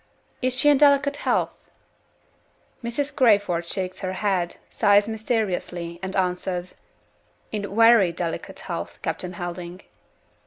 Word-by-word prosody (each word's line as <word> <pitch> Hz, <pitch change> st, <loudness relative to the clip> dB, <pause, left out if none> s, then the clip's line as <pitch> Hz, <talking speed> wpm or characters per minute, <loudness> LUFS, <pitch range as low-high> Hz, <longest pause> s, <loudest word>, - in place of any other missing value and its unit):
Is 255 Hz, -1 st, +1 dB
she 295 Hz, -, +4 dB
in 290 Hz, -2 st, +6 dB
delicate 280 Hz, 0 st, +4 dB
health? -, -, 0 dB, 1.3 s
Mrs. 255 Hz, +5 st, -2 dB
Crayford 205 Hz, -9 st, +3 dB
shakes 185 Hz, 0 st, -3 dB
her 185 Hz, -1 st, -3 dB
head; 185 Hz, -3 st, -1 dB, 0.2 s
sighs 205 Hz, +1 st, +4 dB
mysteriously; 195 Hz, -6 st, -2 dB
and 190 Hz, 0 st, -5 dB
answers, 180 Hz, -1 st, -2 dB, 0.8 s
"In 200 Hz, -2 st, -4 dB
very 225 Hz, -5 st, +6 dB
delicate 170 Hz, -1 st, -5 dB
health, -, -, -5 dB
Captain 180 Hz, 0 st, -3 dB
Helding." 175 Hz, +1 st, -6 dB
195 Hz, 115 wpm, -24 LUFS, 180-230 Hz, 1.3 s, in